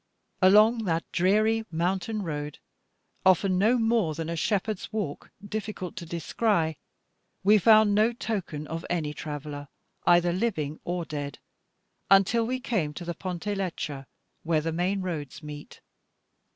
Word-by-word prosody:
Along 215 +4 +6
that 165 -2 0
dreary 215 +5 +2
mountain 185 +5 -1
road, 150 -3 -4 0.7
often 185 0 +4
no 225 +6 +4
more 225 -8 +1
than 165 0 -4
a 170 - -2
shepherd's 205 +3 -1
walk 205 -10 -4 0.2
difficult 210 -4 -5
to 170 -2 -6
descry, 170 -1 0 0.6
we 210 +2 +6
found 215 0 +6
no 215 +3 +4
token 195 -10 -4
of 165 +2 -5
any 155 -4 -1
traveller 145 -1 -6 0.4
either 175 0 +5
living 165 -8 -2
or 175 -1 -2
dead, 145 -2 -5 0.7
until 195 +4 +4
we 255 +1 -1
came 185 - -1
to 175 - -6
the 170 - -3
Ponte 180 +1 -6
Leccia, 160 -8 -4 0.3
where 160 -2 +1
the 165 +1 -2
main 180 +4 0
roads 160 -5 -5
meet. 150 -1 -9
180 Hz, 140 wpm, -27 LUFS, 160-215 Hz, 0.7 s, Along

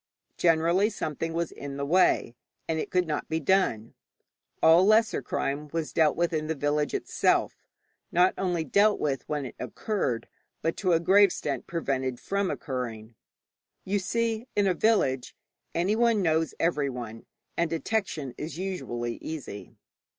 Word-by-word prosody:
Generally 170 +4 +3
something 165 -5 -3
was 170 0 -2
in 140 -1 -7
the 140 - -2
way, 155 -7 +3 0.3
and 160 -1 -1
it - - -3
could 180 -1 +2
not 150 -2 -3
be 160 - 0
done. 150 - +1 0.7
All 165 +3 +7
lesser 215 -3 +4
crime 140 +3 -2
was 165 -2 -3
dealt 155 -2 +3
with 170 0 0
in 155 -1 -1
the 160 - -1
village 145 +1 0
itself, - - +1 0.6
not 180 +2 +4
only 175 -3 -1
dealt 205 +7 +3
with 135 -3 -2
when 150 -2 -2
it 125 - -8
occurred, 195 - -2 0.4
but 165 +1 0
to 185 -3 +2
a 165 - +4
great 195 +4 +6
extent 195 - -3
prevented 135 -6 -2
from 200 -1 -1
occurring. 120 -5 -5 0.7
You 200 +2 0
see, 230 +4 -1
in 205 - +3
a 190 - +3
village 165 - +1 0.4
anyone 215 +4 +2
knows 160 -1 +1
everyone, 125 -9 -2 0.3
and 170 -1 +1
detection 165 - -2
is 160 +2 -5
usually 120 -11 -3
easy. 150 -10 -7
165 Hz, 150 wpm, -27 LUFS, 140-190 Hz, 0.7 s, All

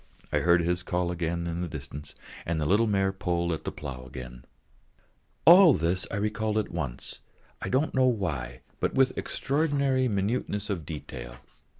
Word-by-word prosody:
I - - +2
heard 85 0 +4
his 90 +1 0
call 90 0 -1
in 85 0 -2
the 90 - -2
distance 70 -1 -8
again, - - -16
and 85 -1 0
the 75 - 0
little 105 +8 +3
mare 95 -2 +2
pulled 85 -2 -1
at 80 - -4
the - - -2
plough 65 -4 -7
again. 60 -1 -9 1.0
All 175 -2 +9
this 85 +3 0
I - - -4
recalled 105 +1 -1
all 110 - +3
at - - -13
once, 75 -8 -5 0.4
I - - -3
don't 135 +5 +1
know 130 -1 +4
why, 75 - -2 0.2
but - - -1
with 130 -1 +3
extraordinary 140 -2 0
minuteness 105 0 -1
of 85 -6 -4
detail. - - -7
90 Hz, 175 wpm, -28 LUFS, 80-110 Hz, 1.0 s, All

